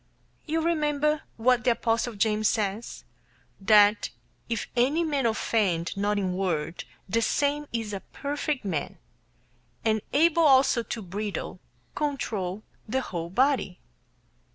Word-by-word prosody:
You 320 Hz, +1 st, 0 dB
remember 300 Hz, -2 st, +1 dB, 0.2 s
what 245 Hz, +1 st, +3 dB
the 250 Hz, -, +3 dB
apostle 230 Hz, 0 st, -1 dB
James 215 Hz, +1 st, +2 dB
says, 210 Hz, +1 st, -2 dB, 0.6 s
that 210 Hz, +1 st, +5 dB, 0.4 s
"if 230 Hz, -3 st, -2 dB
any 275 Hz, +8 st, +2 dB
man 285 Hz, -6 st, +1 dB
offend 205 Hz, -6 st, 0 dB
not 205 Hz, +1 st, 0 dB
in 190 Hz, -2 st, -1 dB
word, 170 Hz, -4 st, -2 dB, 0.2 s
the 225 Hz, +5 st, +1 dB
same 290 Hz, +5 st, 0 dB
is 225 Hz, -3 st, -3 dB
a 195 Hz, -, -3 dB
perfect 285 Hz, +1 st, -4 dB
man, 160 Hz, -7 st, -3 dB, 0.9 s
and 220 Hz, -1 st, +2 dB
able 335 Hz, +3 st, +4 dB
also 270 Hz, -5 st, +5 dB
to 230 Hz, -1 st, -5 dB
bridle 200 Hz, +3 st, -5 dB, 0.3 s
[control] 215 Hz, -10 st, -2 dB, 0.3 s
the 265 Hz, +4 st, 0 dB
whole 170 Hz, -7 st, -5 dB
body." 250 Hz, -3 st, +1 dB
225 Hz, 125 wpm, -27 LUFS, 200-280 Hz, 0.9 s, that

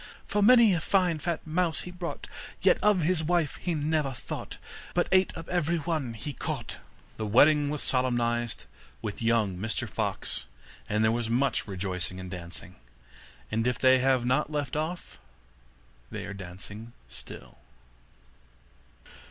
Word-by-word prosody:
For 205 Hz, -, 0 dB
many 235 Hz, -1 st, +7 dB
a 170 Hz, -, +1 dB
fine 180 Hz, -2 st, +2 dB
fat 170 Hz, +2 st, -2 dB
mouse 165 Hz, 0 st, 0 dB
he 180 Hz, -, -7 dB
brought, 180 Hz, -1 st, -5 dB, 0.3 s
Yet -, -, +4 dB
of 210 Hz, -4 st, +4 dB
his 165 Hz, 0 st, +2 dB
wife 170 Hz, -2 st, +1 dB
he 175 Hz, -2 st, -2 dB
never 150 Hz, -2 st, 0 dB
thought, -, -, -6 dB, 0.4 s
But -, -, +2 dB
ate 190 Hz, 0 st, +4 dB
up 165 Hz, -, -7 dB
every 170 Hz, -1 st, +1 dB
one 155 Hz, -7 st, -2 dB
he 140 Hz, +6 st, -5 dB
caught.' -, -, -4 dB
Then -, -, -27 dB
the 110 Hz, -, -2 dB
wedding 145 Hz, +6 st, +5 dB
was 150 Hz, -1 st, -2 dB
solemnized 120 Hz, -2 st, +1 dB, 0.4 s
with 105 Hz, 0 st, -4 dB
young 115 Hz, -5 st, +2 dB
Mr 110 Hz, +2 st, -1 dB
Fox, -, -, -3 dB, 0.4 s
and 105 Hz, +1 st, +2 dB
there 110 Hz, -, +4 dB
was 115 Hz, -1 st, -1 dB
much 130 Hz, +2 st, +1 dB
rejoicing 95 Hz, -1 st, -3 dB
and 90 Hz, -1 st, -7 dB
dancing; 85 Hz, -5 st, -8 dB, 0.7 s
and 115 Hz, +2 st, +1 dB
if 125 Hz, -2 st, +1 dB
they 130 Hz, 0 st, +5 dB
have 130 Hz, -1 st, +2 dB
not 130 Hz, +5 st, +1 dB
left 145 Hz, -3 st, -2 dB
off, 160 Hz, +3 st, -4 dB, 0.9 s
they -, -, -5 dB
are 105 Hz, -, -6 dB
dancing 100 Hz, +4 st, -9 dB
still. 60 Hz, 0 st, -11 dB
130 Hz, 150 wpm, -28 LUFS, 110-165 Hz, 0.9 s, many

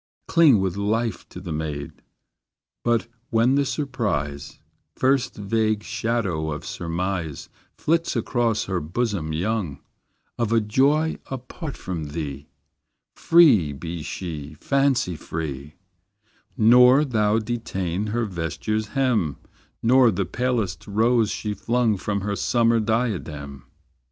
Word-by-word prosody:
Cling 155 Hz, -, +5 dB
with 95 Hz, 0 st, -1 dB
life 110 Hz, +3 st, -1 dB
to -, -, -9 dB
the 90 Hz, -2 st, -7 dB
maid; 75 Hz, -2 st, -5 dB, 0.8 s
But 120 Hz, -1 st, +2 dB, 0.2 s
when 115 Hz, +3 st, +3 dB
the 140 Hz, 0 st, +2 dB
surprise, 100 Hz, -, -2 dB, 0.4 s
First 130 Hz, -1 st, +1 dB
vague 110 Hz, 0 st, 0 dB
shadow 105 Hz, -9 st, -1 dB
of 75 Hz, -1 st, -5 dB
surmise 85 Hz, -2 st, -3 dB, 0.3 s
Flits 165 Hz, 0 st, 0 dB
across 115 Hz, -1 st, 0 dB
her 95 Hz, -2 st, -2 dB
bosom 90 Hz, -1 st, -2 dB
young, 90 Hz, -3 st, -2 dB, 0.6 s
Of 115 Hz, -2 st, 0 dB
a 115 Hz, -, +4 dB
joy 140 Hz, +9 st, +2 dB
apart 135 Hz, +4 st, -6 dB
from 85 Hz, -4 st, -4 dB
thee, 75 Hz, -2 st, -5 dB, 0.7 s
Free 135 Hz, -, +5 dB
be 80 Hz, +3 st, -6 dB
she, 75 Hz, -2 st, -6 dB
fancy 135 Hz, -, +1 dB
free; 75 Hz, -2 st, -6 dB, 0.8 s
Nor 125 Hz, +5 st, +6 dB
thou 110 Hz, -4 st, +2 dB
detain 105 Hz, -5 st, -2 dB
her 115 Hz, +2 st, -1 dB
vesture's 105 Hz, +4 st, -3 dB
hem, 110 Hz, -, +1 dB, 0.5 s
Nor 125 Hz, +1 st, +6 dB
the 95 Hz, -2 st, -1 dB
palest 115 Hz, -3 st, -2 dB
rose 110 Hz, +2 st, +2 dB
she 105 Hz, -1 st, -3 dB
flung 115 Hz, +2 st, +1 dB
From 100 Hz, +1 st, -2 dB
her 100 Hz, +1 st, -2 dB
summer 115 Hz, +1 st, +2 dB
diadem. 85 Hz, -, -2 dB
105 Hz, 115 wpm, -24 LUFS, 85-120 Hz, 0.8 s, Nor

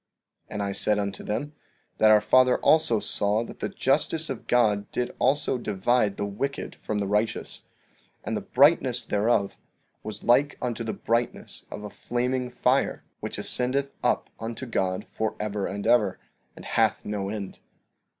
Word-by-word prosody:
15:30 -, -, -11 dB
And 105 Hz, -, -1 dB
I 100 Hz, -, -2 dB
said 105 Hz, +1 st, +2 dB
unto 100 Hz, -1 st, -3 dB
them 145 Hz, +8 st, -3 dB, 0.5 s
that 110 Hz, -, +6 dB
our 105 Hz, 0 st, +7 dB
father 125 Hz, +4 st, +4 dB
also 155 Hz, -8 st, +3 dB
saw 105 Hz, +2 st, 0 dB
that -, -, -10 dB
the -, -, -2 dB
justice 155 Hz, +3 st, +1 dB
of 130 Hz, -, -7 dB
God 105 Hz, -4 st, +2 dB
did 125 Hz, 0 st, -2 dB
also 135 Hz, -1 st, +2 dB
divide 105 Hz, 0 st, +1 dB
the 100 Hz, -, -1 dB
wicked 135 Hz, +8 st, -4 dB
from 110 Hz, -, -3 dB
the 100 Hz, -, 0 dB
righteous; 105 Hz, +3 st, -2 dB, 0.6 s
and -, -, -2 dB
the -, -, -2 dB
brightness 130 Hz, -4 st, +3 dB
thereof 105 Hz, -1 st, +1 dB, 0.4 s
was 105 Hz, -1 st, -7 dB
like 140 Hz, +4 st, +3 dB
unto 120 Hz, -2 st, -3 dB
the 110 Hz, -, -2 dB
brightness 115 Hz, +1 st, -2 dB
of 105 Hz, -, -7 dB
a 105 Hz, -, -7 dB
flaming 125 Hz, +1 st, -2 dB
fire, 125 Hz, +2 st, +1 dB, 0.2 s
which -, -, -5 dB
ascendeth 135 Hz, +3 st, +1 dB
up -, -, +1 dB
unto 115 Hz, +3 st, -5 dB
God 95 Hz, -4 st, -1 dB
forever 105 Hz, -2 st, -3 dB
and 100 Hz, 0 st, -5 dB
ever, 105 Hz, -6 st, +3 dB, 0.4 s
and -, -, -11 dB
hath -, -, +1 dB
no 100 Hz, -2 st, -3 dB
end. 100 Hz, -2 st, -6 dB
115 Hz, 160 wpm, -26 LUFS, 105-125 Hz, 0.6 s, our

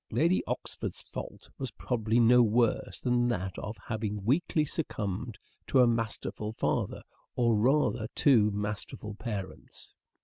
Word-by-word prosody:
Lady 170 Hz, +4 st, +2 dB
Oxford's -, -, -3 dB
fault -, -, -8 dB
was 130 Hz, -, -3 dB
probably 115 Hz, -2 st, 0 dB
no 120 Hz, +1 st, +6 dB
worse 115 Hz, 0 st, +1 dB
than 120 Hz, -1 st, +2 dB
that 95 Hz, -6 st, -2 dB
of 105 Hz, +1 st, -6 dB
having 105 Hz, -3 st, -3 dB
weakly 150 Hz, +4 st, +2 dB
succumbed 115 Hz, -, -3 dB, 0.3 s
to 135 Hz, -, +3 dB
a 125 Hz, -, +8 dB
masterful 115 Hz, -2 st, -2 dB
father, -, -, -1 dB, 0.3 s
or 115 Hz, -2 st, +3 dB
rather 115 Hz, -1 st, +2 dB
two 115 Hz, -7 st, +5 dB
masterful 105 Hz, +1 st, -4 dB
parents. 105 Hz, -3 st, -7 dB
115 Hz, 130 wpm, -30 LUFS, 105-125 Hz, 0.3 s, a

